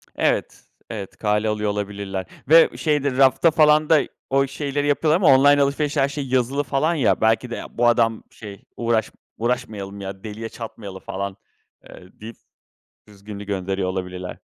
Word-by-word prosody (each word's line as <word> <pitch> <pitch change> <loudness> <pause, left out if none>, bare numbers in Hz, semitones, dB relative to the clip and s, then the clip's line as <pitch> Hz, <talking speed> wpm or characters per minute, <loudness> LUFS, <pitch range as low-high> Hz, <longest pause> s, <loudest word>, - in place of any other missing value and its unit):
Evet, - - -1 0.3
evet 100 -4 -7
kale 105 0 0
alıyor 105 -1 -1
olabilirler. 100 -2 -4 0.2
Ve 165 +1 +6
şeydir, 145 -4 0
rafta 135 +5 +4
falan 150 0 +4
da 155 -3 +6 0.3
o 135 0 +2
şeyleri 145 +1 -3
yapıyorlar 150 +2 +2
ama 160 -7 +5
online 145 +1 +5
alışverişte 140 +1 0
her 135 - +2
şey 140 -1 -5
yazılı 130 +2 0
falan 145 +5 0
ya, 140 - +1
belki 115 +2 +2
de, 120 - -4
"Ya - - -9
bu 120 0 +3
adam, 115 -2 +2
şey, 100 -3 -11
uğraş 115 -2 0 0.3
uğraşmayalım 110 -5 -3
ya, 95 +1 -7
deliye 110 +1 -6
çatmayalım 105 -4 -9
falan" 100 0 -5 0.5
eee, - - -13 0.2
deyip 110 +1 -9 0.7
düzgününü 105 0 -10
gönderiyor 95 -1 -2
olabilirler. 90 -1 -5
115 Hz, 155 wpm, -22 LUFS, 100-140 Hz, 0.7 s, Ve